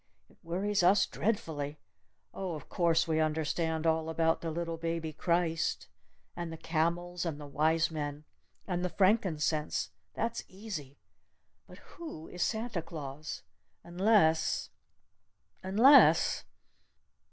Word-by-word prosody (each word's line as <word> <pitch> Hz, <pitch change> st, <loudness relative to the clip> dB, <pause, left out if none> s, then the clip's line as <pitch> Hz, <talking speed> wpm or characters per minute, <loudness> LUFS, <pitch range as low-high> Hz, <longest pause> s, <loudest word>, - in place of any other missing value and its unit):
It -, -, -24 dB
worries 195 Hz, +4 st, 0 dB
us 195 Hz, +3 st, +5 dB
dreadfully! 160 Hz, -10 st, -2 dB, 0.6 s
Oh, 185 Hz, -4 st, -4 dB
of 150 Hz, -, -10 dB
course 170 Hz, -2 st, +2 dB
we 160 Hz, -1 st, +1 dB
understand 160 Hz, +1 st, 0 dB
all 160 Hz, 0 st, +1 dB
about 165 Hz, 0 st, +1 dB
the 165 Hz, -, -3 dB
Little 165 Hz, +1 st, -3 dB
Baby 165 Hz, -1 st, -3 dB
Christ! 165 Hz, 0 st, 0 dB, 0.5 s
And 170 Hz, -1 st, -5 dB
the 165 Hz, -, -6 dB
camels! 170 Hz, +2 st, -1 dB
And 160 Hz, -4 st, -3 dB
the 145 Hz, -, -8 dB
wise 155 Hz, +3 st, +1 dB
men! 145 Hz, -1 st, -4 dB, 0.4 s
And 180 Hz, -2 st, -2 dB
the 180 Hz, -, 0 dB
frankincense! 170 Hz, -7 st, +1 dB, 0.2 s
That's 230 Hz, +1 st, -2 dB
easy! 185 Hz, -9 st, -7 dB, 0.7 s
But -, -, -13 dB, 0.2 s
who 310 Hz, -, -7 dB
is 180 Hz, -, -7 dB
Santa 220 Hz, -5 st, -2 dB
Claus? 155 Hz, -2 st, -7 dB, 0.4 s
Unless 175 Hz, -3 st, +2 dB, 0.9 s
unless 230 Hz, +10 st, +6 dB
165 Hz, 120 wpm, -31 LUFS, 160-185 Hz, 0.9 s, unless